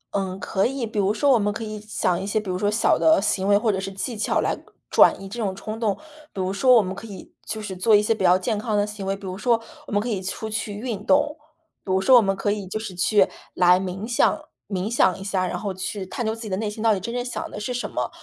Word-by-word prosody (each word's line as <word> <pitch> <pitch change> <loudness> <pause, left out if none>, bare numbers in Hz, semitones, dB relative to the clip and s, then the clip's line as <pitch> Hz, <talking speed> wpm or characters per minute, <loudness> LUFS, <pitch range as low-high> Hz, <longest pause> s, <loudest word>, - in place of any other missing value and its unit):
嗯， 190 -1 -2
可 190 +2 0
以， 265 -1 -3
比 220 -1 -3
如 200 0 +2
说 280 +6 +2
我 245 - +5
们 205 0 +1
可 225 +2 -5
以 215 -1 -6
想 195 -4 -1
一 195 - -4
些 215 +2 +1
比 210 - -9
如 - - -2
说 205 - +1
小 215 +2 +2
的 320 0 +5
行 190 0 0
为， 200 0 +5
或 220 +1 +1
者 190 - -2
是 195 0 -4
技 195 +5 -4
巧 215 - 0
来 - - 0 0.4
转 - - +6
移 195 - -8
这 230 +5 -6
种 190 -2 -2
冲 215 +3 -6
动， 215 -4 +1 0.4
比 - - -8
如 185 +1 -1
说 255 +5 +5
我 225 - +6
们 185 0 -4
可 215 +3 -9
以 195 -4 -11
就 220 - -4
是 205 -3 -6
做 210 +4 +4
一 205 - +5
些 220 - +2
比 215 - -4
较 180 0 +6
健 205 +3 -2
康 215 -1 -1
的 205 - +2
行 210 -2 -6
为， 195 - 0
比 200 - -15
如 185 -1 -4
说 235 0 +2 0.3
我 - - -9
们 205 - +2
可 215 - -3
以 210 -6 -2
出 190 +3 -4
去 220 -1 -3
运 215 -2 -4
动。 290 +4 +3 0.5
比 190 - -3
如 190 - +3
说 255 +7 +6
我 240 - +8
们 195 -2 +1
可 195 +1 -2
以 205 -1 -3
就 205 +4 -3
是 210 -4 -7
去 195 +2 +3 0.3
来 180 0 +5
冥 190 +3 -4
想 245 +6 +2 0.3
冥 195 0 -2
想 190 -6 +2
一 - - -10
下， 190 -2 -1
然 - - -3
后 200 -3 -3
去 190 +1 -4
探 240 - -4
究 220 - 0
自 225 - -11
己 225 - -6
的 190 - -1
内 215 +1 -2
心 210 +1 -7
到 225 -1 +4
底 200 - -1
真 235 +5 -5
正 245 0 -2
想 245 - -4
的 - - -7
是 215 +4 -3
什 240 -4 -3
么。 125 -1 -2
205 Hz, 325 characters per minute, -23 LUFS, 190-225 Hz, 0.5 s, 我